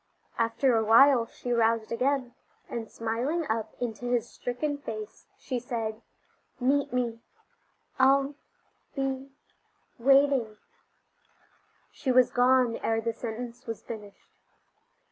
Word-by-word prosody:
After 230 +2 +2
awhile 230 +3 +6
she 245 - -6
roused 230 -1 +2
again, 255 +1 0 0.3
and 225 -2 -5
smiling 245 +9 -2
up 220 -1 -3
into 245 0 -4
his 240 -1 0
stricken 285 +5 -3
face 215 -6 -8
she 255 -2 -3
said: 225 -2 -4 0.6
"Meet 275 +3 +1
me 240 -2 -1 0.8
I'll 275 +1 +4 0.6
be 270 0 -2 0.7
waiting 270 -4 +4 0.7
" - - -37
She 265 - +1
was 250 -1 +5
gone 250 -1 +3
ere 225 0 0
the 230 0 -2
sentence 235 +2 -7
was 225 -1 -5
finished. 210 -3 -10
245 Hz, 110 wpm, -28 LUFS, 225-265 Hz, 0.8 s, awhile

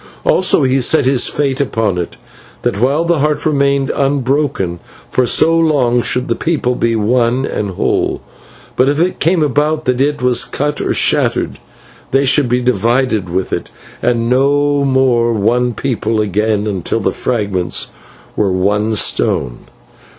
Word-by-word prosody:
Also 185 -5 +3
he 130 0 +2
set 150 +4 +3
this 130 -1 +2
fate 140 -2 -1
upon 110 -8 -1
it: 85 - -5 0.5
that 100 - -1
while 140 +6 +1
the 170 -2 +1
Heart 150 +1 -1
remained 140 -2 +1
unbroken, 135 - -1 0.3
for 125 -1 +1
so 165 +7 +3
long 140 -7 +2
should 125 +3 -2
the - - +1
people 155 -7 -1
be 115 -1 0
one 120 +4 +1
and 105 -6 -3
whole; 95 - -1 0.6
but 130 +2 +3
if 145 +1 0
it 180 +2 0
came 165 0 +2
about 150 +2 0
that 125 0 0
it 145 +1 0
was 125 -1 +3
cut 145 +1 -3
or - - -1
shattered, - - 0 0.5
they 135 +1 +2
should 135 -1 +2
be 125 +1 +1
divided 120 -3 0
with 95 +2 -2
it, - - -2 0.4
to 120 +1 +2
be - - -2
no 140 +3 +2
more 130 -3 +2
one 120 +3 0
people 115 -3 -2
until - - +2 0.4
again 100 -5 -3 0.2
the - - +1
fragments 100 -6 -1 0.5
were 100 -3 +1
one 105 +4 0
stone. 60 - 0
125 Hz, 160 wpm, -15 LUFS, 115-145 Hz, 0.6 s, Also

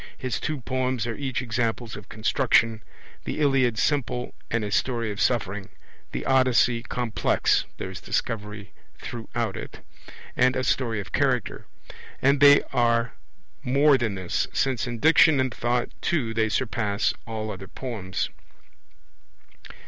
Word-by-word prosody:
His 130 -3 -3
two 155 -4 -3
poems 130 -1 -1
are 115 - -2
each 130 -3 -3
examples 115 -1 -2
of 105 - -11
construction, 115 0 +2 0.4
the - - -4
Iliad 135 -6 +2
simple 125 -2 -1 0.2
and 115 -1 0
a 105 - -4
story 115 +3 0
of 100 - -5
suffering, 100 -5 0 0.4
the - - -4
Odyssey 130 -3 +3
complex 120 -1 0
(there - - -5
is - - -9
Discovery 105 -2 -3 0.3
throughout 115 -3 -4
it) - - -8 0.5
and 125 +1 +3
a 130 - -1
story 115 -5 0
of 100 - -7
character. 130 -5 0 0.5
And 140 +1 +3
they 145 0 +7
are 115 -1 +2 0.5
more 140 +2 +4
than 115 -6 -1
this, 95 -2 -1
since 125 -3 0
in 120 -1 -4
Diction 160 +2 +5
and 130 -2 0
Thought 120 +1 -1
too 125 -10 0
they 110 -1 +1
surpass 105 -3 0
all 110 -1 -4
other 95 -1 -8
poems. 100 -6 -4
120 Hz, 140 wpm, -25 LUFS, 110-130 Hz, 0.5 s, they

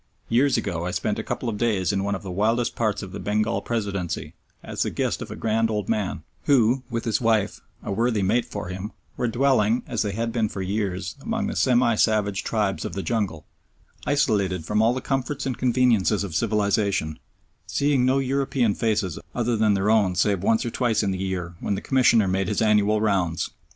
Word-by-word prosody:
Years 130 +4 +3
ago 85 -4 -2
I 90 - -2
spent - - -1
a - - -3
couple - - -4
of 105 -3 -3
days 105 -5 +1
in 100 0 0
one 100 0 -1
of 95 - -7
the 95 - -6
wildest 115 +6 0
parts 110 -3 -1
of 95 - -8
the 100 - -6
Bengal 105 +4 0
Presidency 100 -7 -3 0.3
as - - -5
the - - +1
guest - - -2
of - - -6
a - - -6
grand 110 0 +1
old 105 -3 -2
man 105 -4 -1 0.2
who, 130 -2 +4
with 115 -1 -3
his 110 -1 0
wife 110 -3 +1 0.2
a - - -4
worthy 110 0 +1
mate 115 +6 +2
for 85 - -6
him 95 +4 -6 0.2
were 125 - -1
dwelling, 120 -2 +2
as 115 -4 -2
they 105 -2 -1
had 115 +2 -2
been 110 -2 0
for 95 - -4
years, 95 -1 -2
among 225 +3 -2
the 220 - -3
semi 125 -2 +3
savage 105 -2 +1
tribes 105 -4 -1
of - - -5
the 95 - -3
jungle, 100 -10 -2 0.6
isolated 100 - +1
from 105 +5 +1
all 115 +3 +3
the 130 - -3
comforts 135 +1 -2
and 130 -3 -3
conveniences 120 -5 +2
of 95 -5 -5
civilisation, 100 -6 0 0.5
seeing 140 -3 +1
no 130 +1 +3
European 135 -4 +1
faces 105 -7 -1 0.2
other 120 -1 +1
than 110 -2 +3
their 100 +2 +2
own 100 -5 +3
save 95 +1 +1
once 110 +4 +2
or 120 - -2
twice 120 -3 +1
in 100 - 0
the 95 - -3
year 90 -2 -3
when 100 - -1
the - - -3
Commissioner 120 -6 +3
made 95 0 0
his - - -1
annual 105 -1 +3
rounds. 95 -6 0
110 Hz, 205 wpm, -24 LUFS, 100-120 Hz, 0.6 s, who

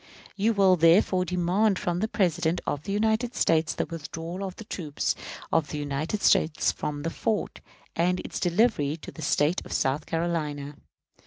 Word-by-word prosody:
You 215 +3 +2
will, 190 -3 +4
therefore, 180 +2 +4
demand 185 +3 +1
from 175 -1 -1
the 220 - 0
President 175 -5 +1
of 145 - -3
the 200 - -3
United 220 +4 +1
States 165 0 +2
the - - -1
withdrawal 165 +3 -6
of 190 -2 -5
the - - -9
troops 160 -8 -2 0.4
of 160 -2 +2
the 150 - -4
United 145 +7 -3
States 165 -5 +3
from 145 -1 -4
that 165 - -2
fort, 215 +4 -2 0.3
and 180 +2 +1
its - - -5
delivery 175 -5 +2
to 155 - -10
the - - -10
State 150 +3 +1
of - - -12
South 140 +3 0
Carolina. 150 -4 -2
170 Hz, 170 wpm, -27 LUFS, 155-195 Hz, 0.4 s, will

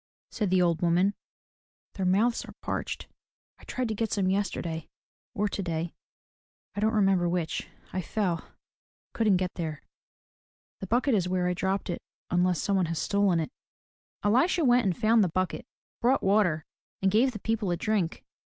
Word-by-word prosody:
'* - - -57
said 210 -3 -1
the 185 0 +4
old 170 -2 +1
woman, 175 +3 +3 0.8
"their 190 -2 -1
mouths 220 +6 +2
are - - -11
parched. - - -3 0.5
I - - -17
tried 255 -1 -2
to - - 0
get 220 +1 -2
some, 190 -2 +1
yesterday 170 -5 -2 0.5
or 210 -1 +1
today, 170 -4 -3 0.4
— - - -50
I - - -2
don't 220 +2 +2
remember 195 -4 +3
which 170 -2 -2
— - - -27
I 185 - -1
fell, 180 -4 -1 0.7
couldn't 215 -5 +3
get 180 0 -2
there. 160 -4 -4 1.0
The 195 - -6
bucket 245 +6 +2
is 185 -4 +1
where 180 -1 +1
I 180 - +1
dropped 190 +2 -1
it 175 - -3 0.3
unless 180 -1 +2
some 200 -1 +1
one 180 -3 +2
has 165 0 -3
stolen 200 -1 +2
it." 160 - -3 0.7
Elisha 275 - +3
went 245 -3 +4
and 180 - 0
found 225 -1 +4
the 185 - +1
bucket, 185 +2 -2 0.3
brought 255 +3 +3
water, 190 -6 +2 0.4
and 190 - +4
gave 240 +6 +4
the 225 - -6
people 220 -1 -1
a 175 - 0
drink. 200 -4 -1
190 Hz, 180 wpm, -28 LUFS, 175-215 Hz, 1.0 s, the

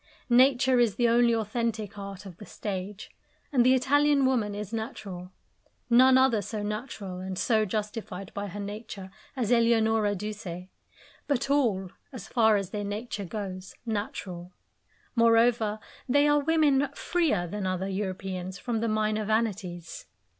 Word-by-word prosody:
Nature 255 0 +5
is 230 -5 +3
the 240 +1 +2
only 235 +1 +4
authentic 220 -1 -2
art 200 -1 -8
of 180 -3 -10
the 210 - -11
stage, 200 0 -6 0.4
and 255 -4 +4
the 255 +1 +5
Italian 285 +2 +3
woman 225 -6 +1
is 210 +1 -6
natural: 195 -5 -6 0.6
none 255 +2 +7
other 260 -5 +4
so 210 +2 -5
natural 210 -3 -5
and 185 0 -5
so 220 0 +2
justified 210 -2 -5
by 205 0 -4
her 200 +2 -7
nature 205 -1 -7 0.2
as 245 -4 -1
Eleonora 225 -3 +3
Duse; 195 -3 -6 0.6
but 275 -1 0
all, 210 -10 +1 0.2
as 230 -6 -8
far 220 -3 +4
as 195 -2 -4
their 205 -1 -3
nature 205 0 -4
goes, 185 -2 -6
natural. 190 -5 -4 0.6
Moreover, 230 -2 +3 0.3
they 285 +3 +4
are 295 0 +4
women 290 -2 +3
freer 315 - 0
than 190 +2 -4
other 185 +1 -2
Europeans 190 -1 -4
from 235 -3 -2
the 230 - -1
minor 215 0 0
vanities. 200 -6 -2
215 Hz, 145 wpm, -28 LUFS, 195-240 Hz, 0.6 s, none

